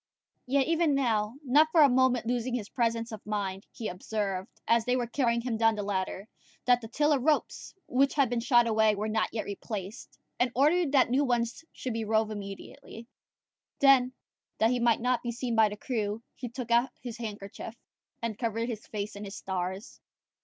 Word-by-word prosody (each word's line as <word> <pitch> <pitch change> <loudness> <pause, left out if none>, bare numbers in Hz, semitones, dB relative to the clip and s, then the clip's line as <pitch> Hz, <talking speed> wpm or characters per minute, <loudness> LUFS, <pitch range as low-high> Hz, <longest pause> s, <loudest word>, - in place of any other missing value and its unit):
Yet 270 +1 +2
even 330 -3 +2
now, 225 -4 0
not 290 +5 +5
for 325 - +5
a - - +8
moment 255 -2 +2
losing 245 +1 -1
his 220 -4 -4
presence 230 -1 -1
of 215 -2 -8
mind, 200 -2 -3
he 225 - -5
observed, 195 0 -3 0.2
as 230 0 +4
they 250 - +2
were 250 -1 0
carrying 235 -1 0
him 235 -2 -2
down 225 0 +3
the 205 - -3
ladder, 195 0 -3 0.4
that 245 -1 +4
the 225 - -7
tiller 295 +4 +2
ropes, 300 +4 -1
which 270 +2 +2
had 280 -3 +4
been 240 0 -1
shot 240 0 +4
away, 220 -1 +3
were 210 +2 -2
not 220 0 0
yet 220 - -3
replaced, 205 +1 -7 0.2
and 245 0 +2
ordered 305 +4 +3
that 260 -3 +4
new 270 +3 +3
ones 240 +1 -1
should 255 - -5
be 225 0 -2
rove 220 0 +1
immediately: 215 +4 -8 0.7
then, 265 -2 +5 0.5
that 225 +2 +3
he 250 - +1
might 235 -1 +3
not 250 0 +1
be 240 - -3
seen 240 0 -3
by 220 -1 +5
the 210 - -7
crew, 215 -1 -3
he 245 - -7
took 240 0 -6
out 240 +2 +4
his 240 -2 -6
handkerchief, 210 0 -7 0.5
and 220 -2 -3
covered 230 0 -1
his 220 -3 -6
face 210 -1 -5
and 205 +1 -7
his 195 - -8
stars. 190 +3 -4
230 Hz, 195 wpm, -29 LUFS, 215-250 Hz, 0.7 s, a